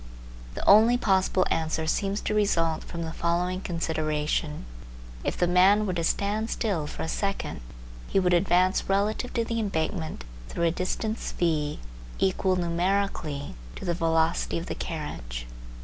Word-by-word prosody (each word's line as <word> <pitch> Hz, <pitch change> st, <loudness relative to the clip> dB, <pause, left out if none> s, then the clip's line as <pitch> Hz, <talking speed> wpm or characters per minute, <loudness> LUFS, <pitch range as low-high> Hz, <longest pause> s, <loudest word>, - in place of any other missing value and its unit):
The -, -, -5 dB
only 225 Hz, +4 st, +7 dB
possible 190 Hz, -4 st, +2 dB
answer 160 Hz, 0 st, 0 dB
seems 195 Hz, +5 st, 0 dB
to -, -, -1 dB
result 165 Hz, -6 st, +1 dB
from 170 Hz, -1 st, -5 dB
the 160 Hz, 0 st, -5 dB
following 175 Hz, +2 st, 0 dB
consideration: 155 Hz, -, -1 dB, 0.6 s
If -, -, -2 dB
the 175 Hz, -, +3 dB
man 190 Hz, +4 st, +5 dB
were 185 Hz, -, -1 dB
to 170 Hz, -1 st, -1 dB
stand 210 Hz, +6 st, 0 dB
still 185 Hz, -10 st, -1 dB
for -, -, -5 dB
a -, -, -3 dB
second, 195 Hz, -, -2 dB, 0.5 s
he -, -, +2 dB
would 180 Hz, -1 st, +2 dB
advance 180 Hz, +2 st, +3 dB
relative 210 Hz, +5 st, +1 dB
to 230 Hz, -1 st, +1 dB
the 230 Hz, 0 st, -2 dB
embankment 160 Hz, -5 st, -2 dB, 0.3 s
through 170 Hz, -, -2 dB
a 165 Hz, -, +3 dB
distance 215 Hz, +5 st, -2 dB
v 155 Hz, -3 st, 0 dB, 0.4 s
equal 190 Hz, 0 st, +2 dB
numerically 175 Hz, -4 st, -1 dB, 0.2 s
to -, -, -7 dB
the 175 Hz, -, +1 dB
velocity 165 Hz, 0 st, +1 dB
of 170 Hz, -, -4 dB
the -, -, -3 dB
carriage. -, -, -5 dB
175 Hz, 150 wpm, -27 LUFS, 160-200 Hz, 0.6 s, only